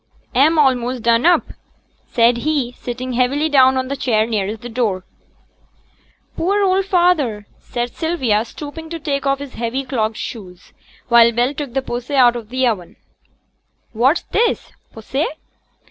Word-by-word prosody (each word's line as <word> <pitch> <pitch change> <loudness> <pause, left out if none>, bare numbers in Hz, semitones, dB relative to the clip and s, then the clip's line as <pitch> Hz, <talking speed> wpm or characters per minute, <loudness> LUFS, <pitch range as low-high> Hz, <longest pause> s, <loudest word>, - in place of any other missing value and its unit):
'A'm 305 +6 +4
a'most 255 -4 +1
done 235 +4 +3
up,' 350 - +3 0.6
said 235 0 +3
he, 275 -1 -1
sitting 250 +1 -6
heavily 260 +5 +1
down 265 -2 +5
on 260 0 -1
the 280 - -3
chair 220 -5 +1
nearest 215 -1 -3
the - - -5
door. 220 -6 -2 1.3
'Poor 400 +4 +1
old 380 0 +2
feyther!' 335 - +1
said 240 0 -4
Sylvia, 260 -11 0
stooping 300 +6 -9
to 335 - -4
take 280 -2 -2
off 275 0 +2
his 280 -1 -9
heavy 240 +4 -3
clogged 225 -5 -2
shoes; 185 -6 -8 0.4
while 235 -1 +6
Bell 240 +4 0
took 280 -3 -6
the 270 - 0
posset 245 +3 -4
out 245 -2 +5
of 230 -3 -7
the 260 +1 0
oven. 205 -8 -2 1.0
'What's 260 +8 +2
this? 465 0 0 0.2
posset? 270 +8 -3
255 Hz, 150 wpm, -19 LUFS, 235-290 Hz, 1.3 s, while